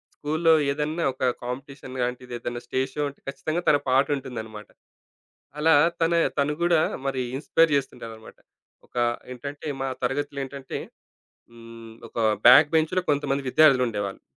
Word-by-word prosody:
స్కూలులో 160 +2 +2 0.2
ఏదన్నా 155 +4 -2
ఒక 130 - -7 0.2
కాంపిటీషన్ 130 +1 -7
లాంటిది 125 0 -4
ఏదైనా 120 0 -5
స్టేజ్‌షో 130 +3 -2
ఉంటే, 140 - -16
ఖచ్చితంగా 155 +4 -3
తన 145 - +6
పాటుంటుందన్నమాట. 125 -6 -1 0.9
అలా 160 +2 +4 0.3
తన 165 +1 +2 0.3
తను 145 +1 +1
గూడా 170 -2 +4 0.3
మరి 135 -1 -1 0.2
ఇన్‌స్పైర్ 165 +3 +2
చేస్తుంటాడన్నమాట. 115 -5 -6 0.5
ఒక - - -20 0.4
ఏంటంటే, 140 +4 -8
మా 135 - -1
తరగతిలో 140 +2 -2
ఏంటంటే, 135 0 -7 0.7
హ్మ్. 115 -1 -12
ఒక - - -24 0.3
బ్యాక్ 145 +5 +8
బెంచ్‌లో 160 +3 +2
కొంతమంది 140 -1 -1
విద్యార్థులుండేవాళ్ళు. 125 -9 +2
135 Hz, 120 wpm, -25 LUFS, 125-150 Hz, 0.9 s, బ్యాక్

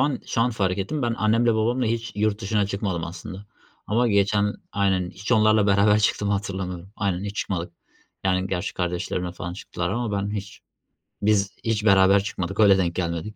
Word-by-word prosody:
an 135 0 +1
şu - - -1
an 125 +2 +3
fark 95 -4 -1
ettim. 140 +10 -2
Ben 120 -1 0
annem 110 +2 +2
ile 115 -2 +3
babamla 120 +3 +1
hiç 115 +1 -2
yurt 105 0 0
dışına 105 -1 0
çıkmadım 100 -4 -2
aslında 90 +3 -8 0.4
ama 120 +3 +2
geçen 100 0 +2 0.2
Aynen 95 -3 +1
hiç 100 +7 -4
onlarla 110 -2 +4
beraber 105 +1 +4
çıktığımı 105 -1 +1
hatırlamıyorum. 95 -2 -4
Aynen, 95 -2 -1
hiç 100 0 -5
çıkmadık, 90 -3 -3 0.5
yani, 95 0 +1
gerçi 90 -2 -3
kardeşlerimle 90 0 -2
falan 90 0 -6
çıktılar 90 -1 -4
ama 115 0 -2
ben 100 - -3
hiç, 100 -2 -6 0.6
biz 100 -1 +2
hiç 110 -1 -1
beraber 95 0 +5
çıkmadık 95 -3 -4
öyle 100 -3 +6
denk 85 -3 0
gelmedik, 85 +4 -3
100 Hz, 180 wpm, -24 LUFS, 95-110 Hz, 0.6 s, öyle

